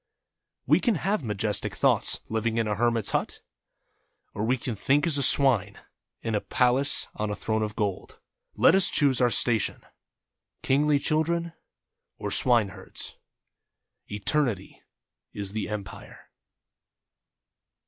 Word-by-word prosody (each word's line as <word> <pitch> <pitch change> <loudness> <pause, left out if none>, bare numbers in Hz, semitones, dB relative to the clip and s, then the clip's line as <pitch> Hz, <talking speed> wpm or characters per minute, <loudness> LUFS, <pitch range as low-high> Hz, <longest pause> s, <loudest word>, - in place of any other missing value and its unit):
We - - +4
can 235 -4 +1
have 195 +4 -1
majes 105 -3 -2
tic - - -5
thoughts, - - +1
living 110 +1 -2
in 115 -1 0
a 105 - 0
hermit's 115 0 0
hut, - - -2 0.9
or 105 - -4
we 125 +4 +1
can 120 -1 -5
think 140 - +1
as 155 -4 +1
a - - 0
swine 120 -8 +4 0.5
in 115 - -3
a 105 - 0
palace 130 +3 +1
on 105 0 -3
a 105 - -3
throne 110 +1 -2
of 105 0 -3
gold 100 -4 -4 0.2
— - - -59
let - - +5
us 190 -1 +5
choose 135 -4 +2
our 125 - +4
station 115 -2 0 0.4
— - - -55
kingly 145 +2 +2
children, 165 +3 -1 0.6
or - - -5
swineherds. 115 -7 0 0.9
Eternity 105 -1 -1 0.5
is 100 -2 -4
the 105 -1 -4
Empire. 105 -3 -9
115 Hz, 140 wpm, -26 LUFS, 105-140 Hz, 0.9 s, let